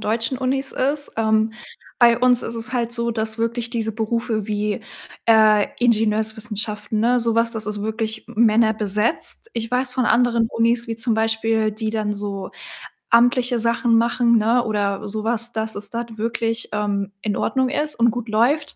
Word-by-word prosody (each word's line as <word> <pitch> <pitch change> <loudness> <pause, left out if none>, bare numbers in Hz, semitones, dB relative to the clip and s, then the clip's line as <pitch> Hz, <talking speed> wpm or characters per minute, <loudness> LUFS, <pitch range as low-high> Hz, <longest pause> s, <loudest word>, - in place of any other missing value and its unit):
deutschen 230 +4 0
Unis 270 +1 -1
ist. 285 +2 -1
Ähm, 220 0 +1 0.5
bei 235 -1 +6
uns 250 0 +4
ist 230 - -4
es 230 +2 -3
halt 235 -2 -1
so, 235 0 -1
dass 220 0 -2
wirklich 235 +1 -2
diese 225 -2 -2
Berufe 220 -1 -2
wie, 210 +1 -2 0.5
äh, 215 -2 +5
Ingenieurswissenschaften, 215 -2 -1
ne, 240 +3 +2
so 230 -1 +1
was, 230 0 +2
das 220 -2 -3
ist 210 -1 -3
wirklich 220 0 -3
männerbesetzt. 220 - +1
Ich 230 -1 -4
weiß 250 0 0
von 255 - +1
anderen 235 -2 +2
Unis 235 +1 +1
wie 225 - -3
zum 230 0 0
Beispiel, 220 0 +1
die 215 +1 -3
dann 215 -1 -2
so 200 -1 -5 0.6
amtliche 245 +1 +3
Sachen 230 +1 +1
machen, 235 0 +3
ne, 230 +3 +2
oder 205 -2 -2
so 215 +1 -3
was, 235 +1 0
dass 220 0 -3
es 205 0 -3
dort 230 -1 -6
wirklich, 230 +1 -2
ähm, 200 -1 -2
in 210 -2 -2
Ordnung 260 +2 0
ist 295 +2 0
und 235 0 +3
gut 240 0 -5
läuft. 270 +8 +1
225 Hz, 170 wpm, -21 LUFS, 215-235 Hz, 0.6 s, bei